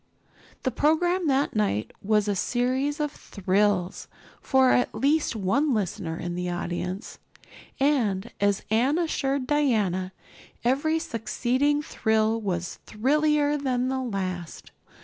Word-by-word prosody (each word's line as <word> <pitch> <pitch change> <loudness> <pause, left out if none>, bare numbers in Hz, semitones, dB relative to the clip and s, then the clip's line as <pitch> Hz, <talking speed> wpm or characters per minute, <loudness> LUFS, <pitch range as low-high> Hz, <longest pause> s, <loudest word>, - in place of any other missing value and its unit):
The 260 - 0
program 340 +6 +2
that 275 -2 +1
night 200 - 0
was 210 0 +2
a 205 - +1
series 255 - 0
of 295 -1 -1
"thrills" 195 -1 0 0.3
for 265 -1 +4
at 245 - +2
least 295 -1 +1
one 240 +8 +1
listener 175 -5 -2
in 175 0 -4
the 180 0 -3
audience, 180 +3 -4 0.6
and, 235 -8 +1
as 200 0 +2
Anne 255 +8 +3
assured 280 -5 0
Diana, 215 -11 +1 0.5
every 280 +6 +2
succeeding 260 +3 0
thrill 220 -3 +1
was 175 -4 -3
thrillier 295 +5 +2
than 255 -3 0
the 265 0 -1
last. 185 -8 -4
245 Hz, 120 wpm, -26 LUFS, 195-285 Hz, 0.6 s, for